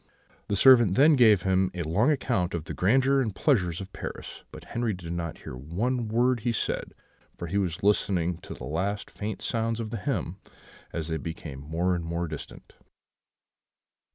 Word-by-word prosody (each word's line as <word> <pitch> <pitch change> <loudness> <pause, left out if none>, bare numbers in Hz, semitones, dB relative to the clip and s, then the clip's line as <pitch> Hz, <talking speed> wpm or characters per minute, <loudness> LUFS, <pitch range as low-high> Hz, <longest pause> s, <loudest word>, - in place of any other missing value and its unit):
"The 100 - 0
servant 120 -3 +6
then 150 +5 +6
gave 110 -7 +5
him 95 0 +2
a 85 - -2
long 95 - +2
account 100 - 0
of 80 - -3
the - - -6
grandeur 135 +7 +3
and 110 -6 -2
pleasures 90 - +1
of 95 0 -9
Paris; - - -7
but - - -10
Henri 120 -2 -2
did 85 -2 -6
not 85 -2 -4
hear - - -9
one 110 - -2
word 120 +3 +2
he 120 +2 0
said, 115 - -2 0.4
for - - -5
he 95 +5 -1
was 90 -3 -2
listening 90 -4 +1
to - - -9
the - - -10
last 95 +7 -2
faint 105 0 -5
sounds 115 0 -1
of 110 -2 -4
the 115 - -3
hymn, 95 - -3 0.5
as 80 -1 -4
they 80 - -1
became 80 -4 -7
more 80 +6 -1
and 85 -1 -2
more 85 +1 -2
distant. 75 -1 -9
95 Hz, 180 wpm, -27 LUFS, 85-115 Hz, 0.5 s, servant